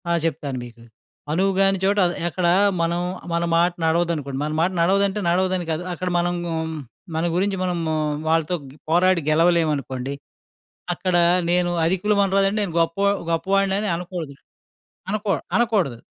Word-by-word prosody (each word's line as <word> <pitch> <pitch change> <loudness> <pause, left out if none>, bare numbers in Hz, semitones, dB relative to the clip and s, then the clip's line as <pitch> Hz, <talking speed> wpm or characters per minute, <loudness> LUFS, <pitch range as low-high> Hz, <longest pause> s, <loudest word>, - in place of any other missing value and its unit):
ఆ! - - +1
చెప్తాను 145 -4 -2
మీకు. 120 -1 -14 0.5
'అనువుగాని 195 +3 +2
చోట' 200 +2 +2
అది 175 - 0
ఎక్కడా 175 0 +1 0.3
మనం 170 +1 0 0.3
మన 170 0 +1
మాట 170 +1 +3
నడవదనుకోండి, 160 -5 0
మన 150 - -2
మాట 175 +3 +2
నడవదంటే 195 +3 +2
నడవదని 185 0 +1
కాదు, 160 +2 -2
అక్కడ 180 +1 -5
మనం 175 0 0
గ్ - - -4 0.7
మన 160 +1 0
గురించి 195 +2 0
మనము 170 -3 -1 0.4
వాళ్ళతో 165 +2 +1
గ్ - - -14 0.2
పోరాడి 180 +1 +3
గెలవలేవనుకోండి, 155 -5 +1 0.8
అక్కడ 180 +1 -1 0.3
నేను 175 0 +2 0.2
'అధికులవనరాదంటే,' 195 +2 +2
నేను 185 -5 -4
గొప్పవ 165 +4 +1 0.2
గొప్పవాడినని 195 +4 +1
అనకూడదు. 170 -4 -6 0.8
అనకూడ 210 -1 0 0.2
అనకూడదు. 205 - +1
175 Hz, 130 wpm, -22 LUFS, 165-195 Hz, 0.8 s, మాట